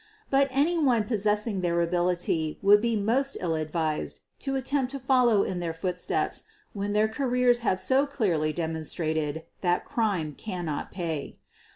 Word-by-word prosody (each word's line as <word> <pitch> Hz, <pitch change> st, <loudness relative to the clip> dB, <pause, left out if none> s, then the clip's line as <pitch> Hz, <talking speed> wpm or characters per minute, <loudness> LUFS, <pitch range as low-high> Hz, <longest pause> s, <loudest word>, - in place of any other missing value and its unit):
But 275 Hz, 0 st, +4 dB
anyone 275 Hz, -4 st, +2 dB
possessing 210 Hz, -2 st, 0 dB
their 170 Hz, -1 st, +1 dB
ability 175 Hz, -2 st, 0 dB
would 205 Hz, +1 st, +6 dB
be 235 Hz, 0 st, +1 dB
most 240 Hz, +7 st, +1 dB
ill 170 Hz, -3 st, -1 dB
advised 155 Hz, 0 st, -2 dB, 0.2 s
to 270 Hz, -1 st, -2 dB
attempt 265 Hz, 0 st, 0 dB
to 275 Hz, -, -4 dB
follow 250 Hz, -5 st, +3 dB
in 185 Hz, -2 st, -3 dB
their 165 Hz, -2 st, -3 dB
footsteps 180 Hz, +1 st, -2 dB, 0.3 s
when 205 Hz, 0 st, -3 dB
their 210 Hz, +1 st, +3 dB
careers 250 Hz, +1 st, +2 dB
have 195 Hz, -5 st, 0 dB
so 270 Hz, +6 st, +3 dB
clearly 180 Hz, -, 0 dB
demonstrated 160 Hz, -1 st, -2 dB, 0.2 s
that 175 Hz, -1 st, +1 dB
crime 200 Hz, -, -1 dB
cannot 175 Hz, -5 st, -4 dB
pay. 165 Hz, -6 st, -4 dB
200 Hz, 145 wpm, -27 LUFS, 165-250 Hz, 0.3 s, would